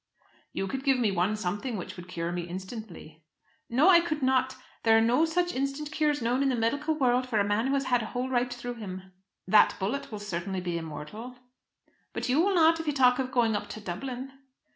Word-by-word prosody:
"You 195 - -3
could 265 +6 -4
give 270 -2 +3 0.2
one 180 +5 +1
something 210 +4 -3
which 180 - -7
would 180 0 -10
cure 170 -1 -3
me 175 0 -4
instantly." 185 -3 -8 0.5
"No, 260 +8 +4
I 360 -3 +8
could 310 -4 -2
not! 260 0 +2 0.3
There 225 -1 +5
are - - +5
no 245 +8 +3
such 350 +2 0
instant 275 +3 -3
cures 300 -4 0
known 245 +3 +1
in 275 - +2
the 255 - +1
medical 285 +7 0
world 255 -3 +1
for 220 -4 +1
a - - +4
man 205 +4 0
who 275 - +1
has 275 - +1
had 245 -3 +1
a 220 - -4
hole 250 +2 -3
right 250 -1 0
through 245 0 -6
him." 190 -1 -7 0.4
"That 210 +2 +5
bullet 220 +9 -3
will 215 - -4
certainly 190 -2 -4
be 175 -1 -3
immortal." 165 +10 -8 0.8
"But - - -3
you 275 +5 +4
will 390 +2 +2
not 330 -1 +5
if 325 - -5
you 295 - +1
talk 250 -2 +4
of 255 -1 -2
going 235 -5 +2
up - - -3
to - - -7
Dublin." 250 +8 -5
245 Hz, 220 wpm, -28 LUFS, 200-275 Hz, 0.8 s, I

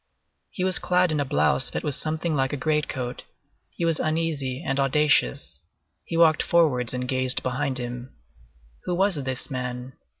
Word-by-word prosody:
He 185 - -4
was 185 -1 +4
clad 180 -1 +2
in 155 - 0
a 145 - +1
blouse 75 - +2
that - - -4
was 145 -3 -1
something 160 +1 -1
like 135 -1 +1
a - - -1
great 150 +2 0
coat; 125 -2 -4 0.5
he 170 - -4
was 165 -2 +1
uneasy 155 -4 -1
and 135 +1 0
audacious; 140 - +1 0.5
he 165 - -3
walked 160 -2 +5
forwards 145 -9 +2
and 125 0 -3
gazed 130 0 +1
behind 130 +1 -1
him. 125 +1 -6 0.7
Who 180 - -1
was 190 -1 +2
this 130 0 -3
man? 125 0 -4
140 Hz, 170 wpm, -25 LUFS, 125-160 Hz, 0.7 s, walked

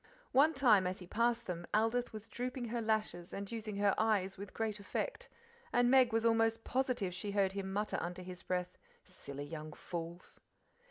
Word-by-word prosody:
One 290 +5 +5
time 220 -9 +5
as 185 +1 -2
he 180 - -9
passed 235 +4 +1
them 175 -1 -4
Aldith 225 +3 +2
was 215 -1 -8
drooping 245 +1 -4
her 235 +1 -1
lashes 215 -6 -1
and 200 +1 -5
using 220 -2 -4
her 200 -1 +3
eyes 205 -4 +2
with 200 0 -8
great 220 -2 -2
effect, 350 - -3 0.4
and 245 0 +4
Meg 260 -2 +6
was 225 +1 +1
almost 225 0 +3
positive 250 -8 0
she 185 +3 -4
heard 195 -2 +3
him 190 -1 -4
mutter 210 +2 -1
under 180 +1 -4
his 180 0 -7
breath, 180 -1 -2 0.2
"Silly 145 -6 -8
young 155 0 -7
fools!" 170 +2 -7
210 Hz, 180 wpm, -35 LUFS, 185-230 Hz, 0.4 s, Meg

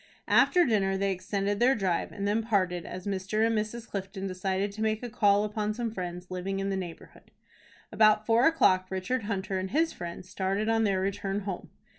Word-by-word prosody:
After 355 -1 +5
dinner 195 -5 +1
they 195 0 +1
extended 200 +2 -2
their 255 +3 +4
drive, 190 -5 -1
and 200 0 -3
then 210 +2 +1
parted, 185 -6 0
as 185 0 -7
Mr. 200 +2 0
and 225 0 +1
Mrs. 220 +2 -3
Clifton 195 0 -5
decided 190 +1 -1
to 215 +2 -8
make 220 +1 0
a 240 - -5
call 205 -3 +3
upon 210 0 -2
some 235 -1 -2
friends 180 -2 -6
living 185 +2 -3
in 195 0 -1
the - - 0
neighborhood. 180 -3 -8 0.6
About 215 -1 +4
four 230 +3 +4
o'clock 185 - +3
Richard 195 +5 -2
Hunter 195 -2 -2
and 190 0 -3
his 320 - +1
friends 175 +1 -7
started 195 +3 -1
on 225 0 +3
their 195 -2 +1
return 195 +1 -2
home. 195 -3 -5
200 Hz, 195 wpm, -28 LUFS, 190-220 Hz, 0.6 s, After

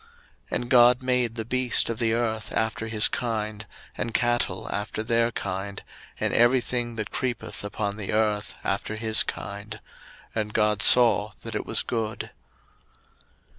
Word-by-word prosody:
01:001:025 455 - -26 0.5
And 120 - -9
God 125 0 +6
made 125 -3 +1
the 110 -2 -3
beast 125 0 +2
of 115 -1 -3
the 115 -2 +2
earth 110 -2 -2
after 110 0 -1
his 110 -1 +3
kind, 110 -3 -3 0.3
and 115 - -4
cattle 120 -1 0
after 105 +1 -3
their 115 +1 +2
kind, 100 -1 -4 0.4
and - - 0
every 120 +2 +5
thing 120 -1 -2
that 110 -2 -4
creepeth 125 -5 -3
upon 105 0 -3
the 100 -3 -4
earth 105 -1 0
after 110 - -2
his 110 0 +2
kind: - - -5 0.5
and 105 -1 -3
God 105 -1 +2
saw 120 -3 +5
that - - -6
it - - -3
was - - +1
good. 110 -3 -3
110 Hz, 155 wpm, -26 LUFS, 105-120 Hz, 0.5 s, God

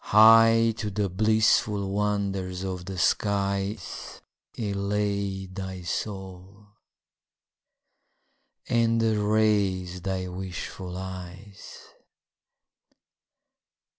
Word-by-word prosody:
High 115 +1 +6
to 105 -3 -3
the 100 0 -1
blissful 105 0 +2
wonders 100 -3 -1
of 90 -2 -4
the 95 0 -6
skies 100 +1 -1 0.4
Elate 100 -2 -2
thy 95 -1 -6
soul, 95 +1 -6 2.0
and 115 -1 +2
raise 105 -4 +1
thy 95 0 -3
wishful 90 0 -6
eyes. 95 +1 -9
100 Hz, 70 wpm, -26 LUFS, 95-105 Hz, 2.0 s, High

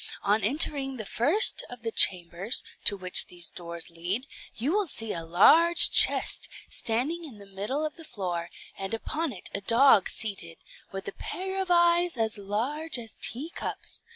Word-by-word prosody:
On 205 +1 +1
entering 270 +2 +2
the 220 - -6
first 300 - +2
of 245 -1 -12
the 225 - -3
chambers, 180 +3 +1 0.2
to 200 - +4
which 185 -1 +5
these 175 -2 -5
doors 170 -1 -8
lead, 180 +9 -2 0.3
you 255 +7 -2
will 410 0 0
see 225 -7 -4
a 165 - -5
large 320 - +6
chest, - - +3 0.2
standing 265 +10 -2
in 270 -9 -11
the 200 - -14
middle 205 +10 -4
of 305 - -7
the 330 - -11
floor, 180 - -5 0.3
and 195 +3 -4
upon 310 +6 -4
it 185 - -6
a 200 - -3
dog 230 -1 +4
seated, 180 -6 -4 0.3
with 195 0 -7
a - - -4
pair 380 +1 -5
of 380 - -5
eyes 345 -2 +3
as 220 -1 -2
large 250 +11 -3
as 225 -2 -10
teacups. 290 +9 0
225 Hz, 170 wpm, -26 LUFS, 195-305 Hz, 0.3 s, large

